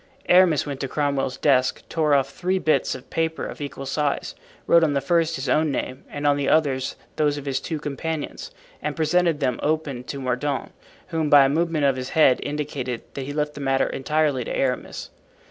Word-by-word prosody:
Aramis 180 -4 +5
went 140 -2 -5
to 135 - -2
Cromwell's 140 -2 -1
desk, 130 -3 +2
tore 155 -3 +2
off 140 0 +1
three 185 +5 -1
bits 155 -6 +1
of 130 - -12
paper 160 0 -1
of - - -8
equal 140 -1 -6
size, 145 +1 -1 0.3
wrote 170 0 +5
on 150 -3 +2
the - - +3
first 165 +3 +1
his 135 -1 -4
own 155 +4 +2
name 130 -1 -4
and 145 0 -5
on 145 0 +4
the 140 - 0
others 140 -4 +1 0.2
those 145 -1 +2
of 145 - -7
his 135 -1 -1
two 160 +2 -4
companions, 150 +1 -4 0.3
and 150 0 -3
presented 165 -1 +2
them 125 -3 0
open 150 -5 -1
to 140 - -5
Mordaunt, 130 +2 -2 0.4
who 165 -2 -1
by 145 -2 +8
a - - +2
movement 160 0 +1
of 135 -2 +2
his 130 0 -4
head 145 -5 +6
indicated 140 -5 -4
that 135 - -5
he 145 - -5
left 150 0 -1
the 145 - -8
matter 135 -1 +2
entirely 145 -2 0
to - - -6
Aramis. 130 -2 -2
145 Hz, 200 wpm, -23 LUFS, 135-155 Hz, 0.4 s, by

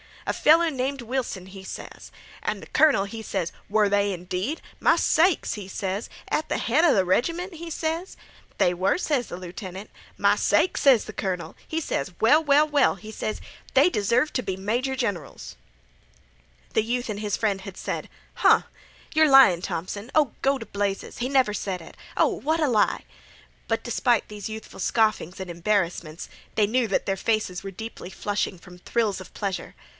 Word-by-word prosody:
'A - - 0
feller 330 +2 +5
named 270 0 -2
Wilson,' 235 -6 -3
he 190 0 -11
ses. - - -9 0.3
An' - - -2
th' - - -13
colonel, 295 -11 +5
he 220 +3 -7
ses: 190 -5 -2 0.2
'Were 210 0 +3
they, 200 0 +2
indeed? 185 - -3
Ahem! - - -21
ahem! - - -22
My - - +4
sakes!' 345 0 +2
he 205 -3 -7
ses. 195 +2 -3 0.2
'At 310 - 0
th' - - -1
head 295 +9 +3
'a 330 - +5
th' 190 -2 +3
reg'ment?' 335 - 0
he 335 +1 -7
ses. 325 +3 -3 0.4
'They 175 - +3
were,' 185 - +2
ses 290 -8 0
th' - - -16
lieutenant. 185 +2 -7 0.3
'My - - +4
sakes!' 370 - +2
ses 265 -6 +6
th' - - -9
colonel. 180 -3 -3
He 320 +1 -2
ses: 175 - -2
'Well, 295 +8 +5
well, 295 +1 +5
well,' 290 -7 +3
he 215 +3 -10
ses. 215 0 -4 0.3
'They 280 +6 +6
deserve 240 - +1
t' 255 - -1
be 190 -5 -3
major 240 +8 -1
generals.'" 200 - -4 1.2
The 220 - +3
youth 245 +2 -2
and 205 -1 -3
his 210 -1 -1
friend 200 -3 0
had 195 -1 -9
said: - - -4 0.3
"Huh!" - - +5 0.5
"Yer 315 0 +5
lyin' 270 - +7
Thompson." 200 +7 -4
"Oh, 300 -5 +3
go 275 0 +2
t' - - -8
blazes!" 200 -1 -3
"He 245 +2 -2
never 260 -6 +3
sed 190 -3 -3
it." 165 - -13 0.2
"Oh, - - +4
what 315 +3 -1
a 305 - +2
lie!" 220 -5 +2
"Huh!" - - -26
But - - -1
despite 240 -4 +1
these 210 0 -6
youthful 220 0 -8
scoffings 215 -6 +1
and 190 -1 -6
embarrassments, 170 -3 -1 0.3
they 215 - +4
knew 240 +2 +1
that 195 - 0
their 195 -1 -1
faces 215 -4 -1
were 195 - -5
deeply 220 -2 -8
flushing 205 -1 -2
from 180 +1 -14
thrills 215 0 0
of 185 - -12
pleasure. 195 -3 -4
215 Hz, 190 wpm, -25 LUFS, 190-270 Hz, 1.2 s, lyin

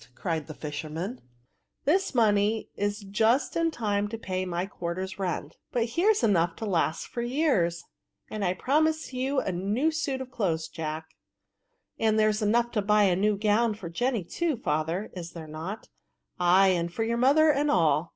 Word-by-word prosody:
cried 165 -4 -3
the 155 - -7
fisherman; 160 - -5 0.3
*' - - -50
this 360 0 +2
money 215 -1 +2
is 205 +1 -2
just 220 +6 +1
in 330 0 +2
time 205 -7 -1
to 225 +2 -5
pay 185 -4 -3
my 175 0 -2
quarterns 185 0 -5
rent; 175 -5 -3
but 235 -1 0
here's 380 - +2
enough 175 -6 +2
to 225 - -5
last 170 -5 0
VfiEB6. - - -9
65 - - -18
for 240 - -2
years; 240 - +1 0.5
and 215 -1 -3
I 180 -1 +1
promise 315 +6 +1
you 265 +2 0
a 190 - -2
new 205 - 0
suit 305 -4 -2
of 260 -1 -7
clothes^ 170 -9 -1
Jack." 160 0 -5 0.5
" - - -49
And 220 -1 +2
there's 215 0 +2
enough 235 +3 +2
to 215 - 0
buy 210 +1 +4
a 185 -3 +4
new 205 +2 +1
gown 215 +2 +2
for 185 -6 -8
J^iny 240 0 -1
too^ 320 - -1
father, 160 +6 -1
is 175 -2 -7
there 165 -2 -8
not? 160 +7 -7 0.2
" - - -51
" - - -41
Ay, 185 +2 +5
and 170 -2 0
for 225 +6 -2
your 230 +1 0
mother 290 +5 +5
and 290 +1 +1
all." 165 - +2
205 Hz, 195 wpm, -27 LUFS, 175-240 Hz, 0.5 s, Ay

